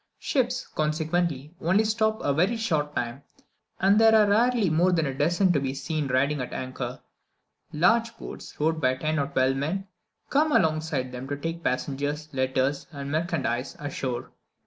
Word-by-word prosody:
Ships, 250 -2 0
consequently, 155 -1 -1
only 185 +6 +3
stop 220 0 +1
a 140 - +2
very 185 +10 +2
short 155 -10 -1
time, 120 +3 -3 0.6
and 200 +3 +4
there 225 0 +7
are 215 -1 +6
rarely 230 +1 +3
more 175 +4 +3
than 165 -3 +2
a 135 - -2
dozen 175 +7 +2
to 145 - +2
be 135 0 -2
seen 155 0 -2
riding 140 +2 +1
at 125 - -5
anchor. 130 -1 -5 0.7
Large 230 +8 +2
boats, - - -9
rowed 160 +1 +1
by 130 -1 +2
ten 155 +3 -1
or 140 - 0
twelve 135 -1 +1
men, 180 +8 -2 0.4
come 300 +2 +3
alongside 155 -6 +1
them 125 +1 -6
to 145 +1 -3
take 165 +3 -3
the 170 - 0
passengers, 145 +4 -3
letters, 130 +1 0
and 140 -2 -6
merchandise 145 -6 -1
ashore. 130 -4 -4
155 Hz, 170 wpm, -26 LUFS, 135-185 Hz, 0.7 s, there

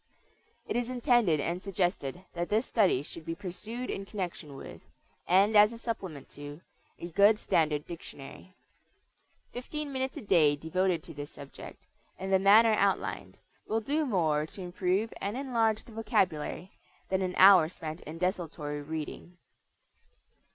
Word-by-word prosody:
It - - -3
is 240 0 0
intended 240 - +3
and 170 +4 -2
suggested 180 -4 -2
that 175 0 -3
this 220 +4 +2
study 190 - +2
should 160 +2 -10
be 165 +1 -4
pursued 215 +8 -6
in 195 - -4
connection 175 -8 -5
with, - - -10 0.5
and 195 +4 +4
as 210 +1 +7
a - - -8
supplement 190 - -5
to, 145 +2 -9 0.4
a 170 - -7
good 200 +4 +5
standard 150 -6 +1
dictionary. 170 +2 -10 1.0
Fifteen 285 +3 -5
minutes 265 +2 -2
a - - -5
day 160 -7 +4
devoted 170 +3 0
to 165 - -10
this 145 0 -7
subject, 140 -1 -11 0.3
in 190 +1 -5
the 190 - +5
manner 215 +4 +6
outlined, 200 -2 0 0.3
will 220 - +1
do 290 +8 0
more 160 - +1
to 190 - -10
improve 185 +4 -1
and 205 +5 -2
enlarge 230 -5 0
the - - -15
vocabulary 190 -5 -1 0.4
than 190 0 +1
an 185 -1 -2
hour 185 -4 +8
spent 160 -2 -7
in 155 +2 -8
desultory 165 -5 -3
reading. 160 +3 -6
185 Hz, 150 wpm, -30 LUFS, 160-220 Hz, 1.0 s, hour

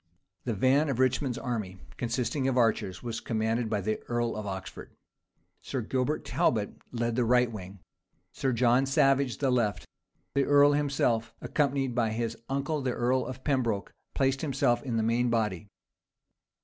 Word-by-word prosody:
The 115 -3 -1
van 135 +8 +3
of 135 - -1
Richmond's 130 0 +1
army, 110 -8 -4 0.2
consisting 125 +3 -1
of 130 -1 +1
archers, 105 -6 +1
was 115 -2 -3
commanded 110 0 -1
by 105 - 0
the 110 +2 -1
earl 120 -1 -1
of 110 -1 -5
Oxford: 95 -1 -6 0.7
Sir 130 - -3
Gilbert 130 +6 -1
Talbot 105 -3 +1 0.2
led 115 -1 -1
the 125 - +2
right 125 0 +3
wing; 95 -3 -9 0.5
Sir 135 - -1
John 125 +2 +3
Savage 135 -2 +3
the 135 -2 +1
left: 115 -5 0 0.5
the 140 - +3
earl 145 0 +6
himself, 135 -6 0
accompanied 140 -3 0
by 120 -2 +1
his 115 +1 -2
uncle 140 +3 -1
the 130 -2 -1
earl 125 +1 +1
of 130 0 -7
Pembroke, 120 -8 0 0.2
placed 135 0 +1
himself 135 -4 +1
in 120 -4 -2
the 110 - +1
main 120 +2 +2
body. 105 -4 -1
120 Hz, 160 wpm, -29 LUFS, 115-135 Hz, 0.7 s, earl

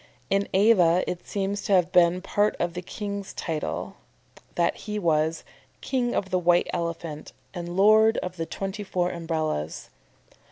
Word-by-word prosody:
In 195 0 +2
Ava 185 -4 +5
it 175 - -5
seems 200 0 -2
to 200 - +1
have 180 -1 +3
been 180 +1 +4
part 205 +1 +1
of 175 0 -1
the 180 - -5
king's 200 +2 -6
title, 160 -3 -4 0.6
that 170 -1 +1
he 210 -1 -5
was 160 -3 +1 0.4
"King 245 -2 -1
of 190 -2 -2
the 185 - +2
white 175 0 +3
elephant, 165 -2 -4 0.2
and 175 -1 -5
Lord 215 +3 +5
of 180 0 -5
the 165 0 -3
twenty 195 +1 -5
four 180 -2 -1
Umbrellas." 160 - -3
180 Hz, 155 wpm, -26 LUFS, 170-200 Hz, 0.6 s, Ava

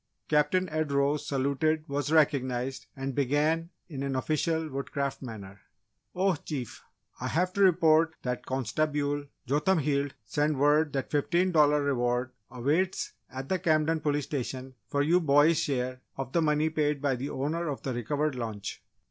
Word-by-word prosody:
Captain 150 +5 +2
Ed 155 -1 -1
rose, 140 +1 +1
saluted, 145 +3 0
was 145 +1 -2
recognised, 130 -4 +1
and 135 0 -4
began 150 +5 +1 0.2
in 140 -5 -6
an 140 -1 -2
official 160 +4 0
Woodcraft 140 0 -3
manner: 100 -6 -9 0.5
"Oh 190 +1 +3
Chief! 145 -6 -6 0.4
I - - -3
have 180 +3 0
to 200 - 0
report 165 -3 +4
that 125 -1 -2
Consta_bule_ 145 +3 -1 0.2
Jotham 150 +8 +2
Heald 140 -2 0
sent 145 +5 0
word 150 +2 +3
that 135 -1 -3
$15 150 -2 +3
reward 125 -2 0 0.2
awaits 145 +10 0 0.2
at 130 +1 -6
the 185 +3 0
Camden 160 -2 +2
Police 145 -2 0
Station 130 -1 -4
for 140 +5 +1
you 170 +5 +4
boys' 150 0 +4
share 130 -4 -2 0.2
of 135 -1 -5
the 170 - +3
money 155 0 +2
paid 150 -2 0
by 140 -2 +1
the 135 +4 -4
owner 160 +5 -2
of 145 -3 -4
the 130 - -2
recovered 145 +6 -1
launch." 110 -5 -5
145 Hz, 155 wpm, -29 LUFS, 135-155 Hz, 0.5 s, report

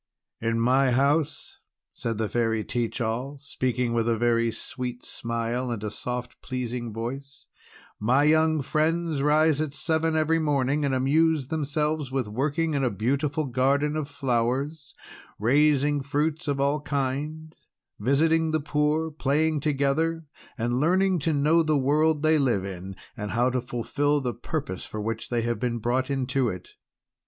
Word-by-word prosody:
"In 115 0 0
my 130 +3 +3
house," 145 - 0 0.3
said 115 -9 -3
the 110 0 0
Fairy 110 0 0
Teach 120 +2 -2
All, 125 +5 -2
speaking 125 -3 -1
with 115 0 +1
a 115 - +1
very 115 0 +2
sweet 125 +2 -6
smile, 115 +2 -3
and 115 -3 -4
a 105 - -3
soft, 125 +2 -5
pleasing 125 -2 -4
voice, 135 +4 -6 0.5
"my 125 +7 +3
young 155 0 +3
friends 160 +1 0
rise 150 +1 +3
at 150 -2 -3
seven 160 +2 0
every 160 +1 +2
morning, 145 -1 +1
and 135 -2 +1
amuse 145 +1 +2
themselves 150 -2 -1
with 130 -4 -1
working 145 +8 -1
in 140 -2 0
a 125 - +2
beautiful 140 +8 -1
garden 140 +4 +1
of 150 -2 -3
flowers, 135 +3 -1 0.4
raising 145 +4 +3
fruits 150 +4 -1
of 140 -1 0
all 140 +2 +1
kinds, 150 +3 -4 0.3
visiting 160 +7 +2
the 155 0 +1
poor, 150 +2 0
playing 155 +1 +1
together, 155 +3 0 0.3
and 120 +1 0
learning 185 +4 +3
to 160 +2 0
know 155 +3 +3
the 155 -2 +2
world 150 +3 +2
they 155 0 +4
live 120 -9 +1
in 95 0 -7 0.2
and 105 -3 -5
how 120 +3 +2
to 125 0 0
fulfill 140 +4 0
the 125 -3 -2
purposes 135 - -4
for 110 - -6
which 115 +1 -4
they 120 -2 0
have 120 -2 -1
been 120 0 -1
brought 125 +4 0
into 130 -2 0
it. 90 -3 -7
140 Hz, 155 wpm, -26 LUFS, 120-155 Hz, 0.5 s, they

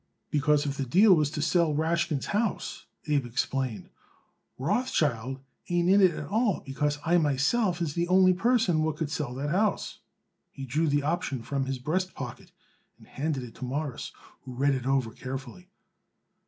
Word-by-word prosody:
"Because 150 0 +2
if 140 -1 -3
the 135 - -1
deal 190 - +6
was 150 -4 +3
to 150 0 -3
sell 165 -2 +2
Rashkin's 160 -2 0
house," 215 +1 -2 0.2
Abe 145 -5 0
explained, 130 -1 -2 0.7
"Rothschild 135 - 0 0.3
ain't 175 0 +2
in 200 +1 +6
it 180 -4 +5
at - - -5
all, 215 0 +1
because 145 +2 -1
I 175 +2 +4
myself 170 - +1
is 150 -3 -2
the 170 +2 -1
only 185 0 +5
person 205 -5 +2
what 155 -1 -1
could 150 -2 -3
sell 145 -5 -3
that 145 +3 -3
house." 205 +4 0 0.5
He 135 - -8
drew 155 +6 0
the 145 -1 +1
option 150 -6 -2
from 135 +1 -2
his 135 0 -2
breast 180 +8 -2
pocket 125 -4 -8 0.5
and - - -18
handed 140 -2 -3
it 120 -2 -9
to 130 - -10
Morris, 140 0 -4 0.3
who 125 -1 -9
read 140 +2 +2
it 130 -1 -3
over 135 -4 +1
carefully. 135 +8 -8
150 Hz, 170 wpm, -28 LUFS, 135-175 Hz, 0.7 s, deal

